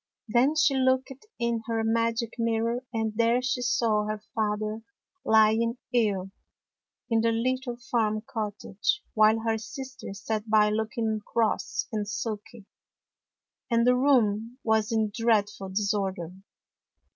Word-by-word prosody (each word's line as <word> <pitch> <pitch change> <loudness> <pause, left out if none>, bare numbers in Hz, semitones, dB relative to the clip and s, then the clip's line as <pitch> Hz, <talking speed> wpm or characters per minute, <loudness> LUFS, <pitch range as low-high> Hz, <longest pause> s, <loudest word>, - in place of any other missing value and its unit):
Then 245 +7 +3
she 305 -2 +4
looked 260 0 +1 0.2
in 235 -1 -1
her 225 -1 0
magic 230 +1 0
mirror, 230 +2 0
and 220 -2 -1
there 235 +2 +3
she 255 0 -1
saw 225 -4 +1
her 215 0 -2 0.2
father 215 0 -1 0.4
lying 220 +2 +4 0.2
ill 200 -5 +1 0.8
in 225 -1 +3
the 230 0 +2
little 250 +1 -1
farm 220 -4 -1
cottage, 210 -2 -2
while 215 +1 +4
her 225 -1 0
sisters 260 -4 -8
sat 220 0 -2
by 210 -1 +4
looking 220 0 -1
cross 225 -1 -1
and 210 -2 -2
sulky, 215 -1 -5 1.0
and 235 -1 +3
the 250 0 +5
room 240 -3 +2
was 220 -1 +1
in 220 -2 +1
dreadful 210 -4 +1
disorder. 190 -3 -1
225 Hz, 125 wpm, -27 LUFS, 215-235 Hz, 1.0 s, the